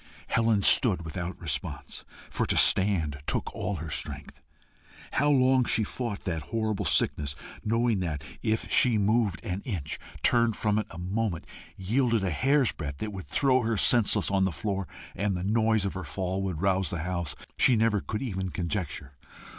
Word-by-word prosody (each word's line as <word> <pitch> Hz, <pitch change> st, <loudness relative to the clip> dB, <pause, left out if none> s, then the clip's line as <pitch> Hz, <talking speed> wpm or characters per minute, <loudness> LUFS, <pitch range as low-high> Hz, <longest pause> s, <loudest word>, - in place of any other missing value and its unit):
Helen 115 Hz, -3 st, +2 dB
stood 95 Hz, -8 st, +5 dB
without 85 Hz, +2 st, -5 dB
response, 80 Hz, -5 st, -4 dB, 0.3 s
for -, -, -1 dB
to -, -, 0 dB
stand 85 Hz, -8 st, +4 dB
took -, -, -1 dB
all 100 Hz, -, -3 dB
her 80 Hz, -1 st, -6 dB
strength. -, -, -5 dB, 0.7 s
How 145 Hz, +2 st, +2 dB
long 130 Hz, -2 st, +4 dB
she 115 Hz, -, +2 dB
fought 110 Hz, -1 st, -4 dB
that 80 Hz, -4 st, -3 dB
horrible 110 Hz, -2 st, -1 dB
sickness, 70 Hz, -2 st, 0 dB, 0.3 s
knowing 115 Hz, -1 st, +1 dB
that, 80 Hz, -6 st, -3 dB, 0.2 s
if 110 Hz, -1 st, 0 dB
she 120 Hz, -4 st, +5 dB
moved 105 Hz, 0 st, +1 dB
an 90 Hz, +2 st, -3 dB
inch, 85 Hz, -, -4 dB, 0.2 s
turned 115 Hz, -2 st, +3 dB
from 105 Hz, 0 st, +1 dB
it 110 Hz, -, -4 dB
a 85 Hz, -, -10 dB
moment, 95 Hz, 0 st, -2 dB, 0.3 s
yielded 115 Hz, +3 st, +1 dB
a 95 Hz, -, 0 dB
hair's 135 Hz, -, +2 dB
breadth, 70 Hz, 0 st, -6 dB
it 105 Hz, -1 st, -4 dB
would 95 Hz, -2 st, -7 dB
throw 130 Hz, -2 st, +2 dB
her 115 Hz, -1 st, -1 dB
senseless 115 Hz, -2 st, +3 dB
on 95 Hz, -1 st, +2 dB
the 95 Hz, -, +1 dB
floor, 100 Hz, +1 st, -3 dB, 0.3 s
and 100 Hz, -2 st, -1 dB
the 90 Hz, -, -4 dB
noise 110 Hz, 0 st, +2 dB
of 100 Hz, -, -2 dB
her 95 Hz, -1 st, -5 dB
fall 95 Hz, +5 st, -3 dB
would 95 Hz, -3 st, -3 dB
rouse 95 Hz, -1 st, +2 dB
the 85 Hz, -2 st, -3 dB
house, 85 Hz, -3 st, -3 dB, 0.2 s
she 125 Hz, -, +4 dB
never 110 Hz, -2 st, +2 dB
could 110 Hz, +4 st, -4 dB
even 95 Hz, -6 st, -3 dB
conjecture. 85 Hz, -5 st, -4 dB
100 Hz, 175 wpm, -28 LUFS, 90-115 Hz, 0.7 s, stood